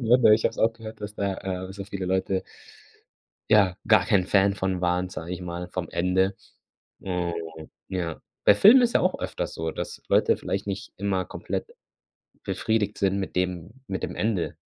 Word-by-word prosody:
ne, 120 Hz, +1 st, +4 dB
ne 110 Hz, -3 st, +7 dB
ich 110 Hz, -, -1 dB
habe -, -, +4 dB
es -, -, -13 dB
auch 115 Hz, +1 st, +3 dB
gehört, 110 Hz, -1 st, -10 dB
dass 105 Hz, 0 st, -6 dB
da, 100 Hz, -1 st, -1 dB
äh 95 Hz, -1 st, -4 dB
dass 95 Hz, +2 st, -10 dB
da 100 Hz, -, -5 dB
viele 100 Hz, -1 st, -5 dB
Leute 95 Hz, 0 st, 0 dB, 1.1 s
ja, 100 Hz, -4 st, +5 dB
gar 105 Hz, -5 st, +5 dB
kein 100 Hz, -5 st, +3 dB
Fan 100 Hz, +1 st, +3 dB
von 95 Hz, -1 st, -1 dB
waren, 90 Hz, +1 st, +1 dB
sage 85 Hz, -1 st, -7 dB
ich 90 Hz, -, -7 dB
mal, 90 Hz, 0 st, -5 dB
vom 90 Hz, -2 st, -4 dB
Ende. 95 Hz, +2 st, +1 dB, 0.7 s
Oh, 90 Hz, -2 st, -2 dB, 0.5 s
ja. 90 Hz, -4 st, -3 dB, 0.2 s
Bei 100 Hz, -, +7 dB
Filmen 240 Hz, -, +8 dB
ist 235 Hz, -1 st, +2 dB
ja -, -, +4 dB
auch 185 Hz, +1 st, +1 dB
öfters -, -, -4 dB
so, 80 Hz, 0 st, -3 dB
dass -, -, -6 dB
Leute -, -, +3 dB
vielleicht 100 Hz, +1 st, -3 dB
nicht 100 Hz, -1 st, -5 dB
immer 95 Hz, -1 st, 0 dB
komplett -, -, -4 dB, 0.8 s
befriedigt 110 Hz, -2 st, -1 dB
sind 95 Hz, 0 st, +1 dB
mit 95 Hz, -, -4 dB
dem 90 Hz, 0 st, -2 dB, 0.2 s
mit 95 Hz, -1 st, -4 dB
dem -, -, -3 dB
Ende. 105 Hz, -6 st, -1 dB
95 Hz, 190 wpm, -26 LUFS, 90-105 Hz, 1.1 s, Filmen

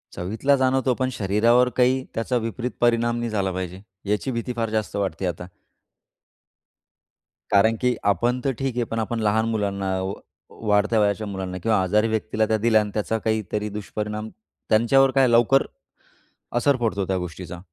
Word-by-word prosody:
चवीतला 110 Hz, +10 st, +1 dB
जाणवतो, 130 Hz, -1 st, +2 dB
पण 130 Hz, +1 st, -1 dB
शरीरावर 115 Hz, +4 st, +3 dB
काही 130 Hz, +1 st, +3 dB
त्याचा 115 Hz, +2 st, 0 dB
विपरीत 120 Hz, +2 st, -3 dB
परिणाम 120 Hz, 0 st, +2 dB
नाही 120 Hz, 0 st, -2 dB
झाला 100 Hz, -3 st, -1 dB
पाहिजे. 95 Hz, 0 st, -5 dB, 0.3 s
याची 105 Hz, +6 st, 0 dB
भीती 120 Hz, +1 st, -3 dB
फार 115 Hz, -1 st, -1 dB
जास्त 110 Hz, -1 st, -2 dB
वाटते 95 Hz, -3 st, -2 dB
आता. 90 Hz, 0 st, -5 dB, 2.0 s
कारण, 110 Hz, +3 st, +4 dB
की 125 Hz, -1 st, +2 dB
आपण 120 Hz, +6 st, +1 dB
तर 135 Hz, -, +2 dB
ठीक 135 Hz, -3 st, -2 dB
आहे, 120 Hz, -, +1 dB
पण 115 Hz, 0 st, -4 dB
आपण 115 Hz, +1 st, -2 dB
लहान 110 Hz, +1 st, +2 dB
मुलांना, 100 Hz, -3 st, -1 dB
वा 95 Hz, +1 st, -3 dB, 0.5 s
वाढत्या 105 Hz, +2 st, +3 dB
वयाच्या 105 Hz, +1 st, +1 dB
मुलांना 95 Hz, -2 st, -5 dB
किंवा 110 Hz, -4 st, +2 dB
आजारी 105 Hz, +4 st, +2 dB
व्यक्तीला 110 Hz, 0 st, 0 dB
त्या 110 Hz, -, +2 dB
दिल्या 110 Hz, 0 st, +3 dB
आणि 105 Hz, -1 st, -5 dB
त्याचा 110 Hz, +1 st, -1 dB
काहीतरी 105 Hz, -1 st, -2 dB
दुष्परिणाम, 105 Hz, +1 st, -5 dB, 0.4 s
त्यांच्यावर 130 Hz, +5 st, +4 dB
काय 135 Hz, -1 st, +5 dB
लवकर 120 Hz, +3 st, +4 dB, 0.9 s
असर 140 Hz, +3 st, +3 dB
पडतो 110 Hz, -5 st, -1 dB
त्या 95 Hz, -, 0 dB
गोष्टीचा. 90 Hz, 0 st, -6 dB
110 Hz, 160 wpm, -23 LUFS, 100-120 Hz, 2.0 s, काय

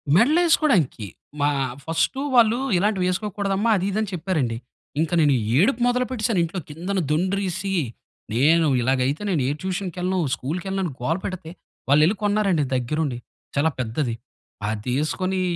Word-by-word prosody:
మెడలేసుకోడానికి, 275 Hz, -, +3 dB, 0.3 s
మా 145 Hz, -, +3 dB, 0.4 s
ఫస్టు 165 Hz, +11 st, 0 dB, 0.2 s
వాళ్ళు 235 Hz, 0 st, +5 dB, 0.2 s
"ఇలాంటివేసుకోకూడదమ్మా" 200 Hz, +2 st, 0 dB
అది, 185 Hz, -, -1 dB
ఇది 215 Hz, -, -1 dB
అని 215 Hz, -, -2 dB
చెప్పారండి. 155 Hz, -10 st, -1 dB, 0.4 s
ఇంక 160 Hz, -1 st, 0 dB
నేను 145 Hz, -2 st, +4 dB, 0.3 s
ఏడుపు 230 Hz, -, +2 dB
మొదలు 250 Hz, +1 st, +1 dB
పెట్టేసాను. 230 Hz, -5 st, 0 dB
ఇంట్లో 170 Hz, +3 st, -3 dB
కిందన 180 Hz, +6 st, -3 dB
దుండ్రిసి, 190 Hz, +3 st, -1 dB, 0.6 s
నేను 155 Hz, +6 st, +4 dB
ఇలాగైతే 130 Hz, -, 0 dB
నేను 160 Hz, -7 st, +1 dB
ఏ -, -, +1 dB
ట్యూషన్‌కెళ్ళను, 185 Hz, 0 st, -2 dB, 0.2 s
స్కూల్‌‌కెళ్ళను 180 Hz, +8 st, -3 dB
అని 160 Hz, -, -3 dB
గోల 160 Hz, +7 st, 0 dB
పెడితే 185 Hz, -4 st, -5 dB, 0.4 s
వాళ్ళు 145 Hz, +2 st, +6 dB
యెళ్లి 200 Hz, +5 st, +1 dB
కొన్నారండి 200 Hz, -7 st, +2 dB
దగ్గరుండి. 130 Hz, +1 st, -1 dB, 0.4 s
చాలా 160 Hz, +3 st, +3 dB
పెద్దది. 120 Hz, +1 st, -1 dB, 0.5 s
అదేసుకొని 150 Hz, -, -1 dB
180 Hz, 125 wpm, -23 LUFS, 150-200 Hz, 0.6 s, వాళ్ళు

